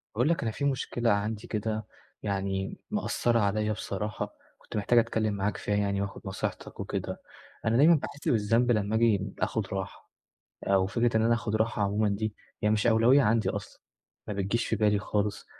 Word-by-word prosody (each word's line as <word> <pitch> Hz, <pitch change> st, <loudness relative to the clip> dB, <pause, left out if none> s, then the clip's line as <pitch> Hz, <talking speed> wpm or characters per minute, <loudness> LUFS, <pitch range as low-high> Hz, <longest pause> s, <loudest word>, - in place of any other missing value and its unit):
باقول 125 Hz, +7 st, +2 dB
لك 170 Hz, -, +1 dB
أنا 115 Hz, -, -1 dB
في 140 Hz, -, -3 dB
مشكلة 125 Hz, -3 st, 0 dB
عندي 105 Hz, +1 st, -1 dB
كده 110 Hz, 0 st, -2 dB, 0.4 s
يعني 95 Hz, -1 st, -2 dB
مأثّرة 120 Hz, -, +1 dB
عليَّ 105 Hz, +1 st, +1 dB
بصراحة 105 Hz, 0 st, -4 dB, 0.2 s
كنت -, -, -8 dB
محتاج 105 Hz, +4 st, +4 dB
أتكلّم 110 Hz, -2 st, 0 dB
معاك 100 Hz, +1 st, -1 dB
فيها 105 Hz, -, -1 dB
يعني 100 Hz, -1 st, 0 dB
وآخُد 100 Hz, 0 st, -5 dB
نصيحتك 95 Hz, 0 st, -5 dB
وكده، -, -, -4 dB, 0.4 s
أنا 115 Hz, +1 st, +3 dB
دايمًا 160 Hz, +5 st, +7 dB
باحس 145 Hz, -1 st, -5 dB
بالذنب 115 Hz, +2 st, +3 dB
لما 105 Hz, -1 st, +1 dB
آجي 105 Hz, -4 st, +2 dB
آخُد 110 Hz, -4 st, -1 dB
راحة 95 Hz, 0 st, -6 dB, 0.6 s
أو 95 Hz, -1 st, +4 dB
فكرة 115 Hz, +1 st, +1 dB
إن -, -, +2 dB
أنا 115 Hz, +1 st, +4 dB
آخُد 110 Hz, -2 st, -1 dB
راحة 110 Hz, -1 st, 0 dB
عمومًا 105 Hz, +1 st, +2 dB
دي 105 Hz, +1 st, -2 dB, 0.3 s
هي 105 Hz, -, +4 dB
مش 110 Hz, +2 st, +2 dB
أولوية 120 Hz, +5 st, +5 dB
عندي 115 Hz, -1 st, +2 dB
أصلًا، -, -, -6 dB, 0.5 s
ما 105 Hz, -, -2 dB
بتجيش 100 Hz, +4 st, -1 dB
في -, -, +1 dB
بالي 105 Hz, -1 st, +3 dB
خالص، 105 Hz, 0 st, -2 dB
110 Hz, 175 wpm, -28 LUFS, 100-115 Hz, 0.6 s, دايمًا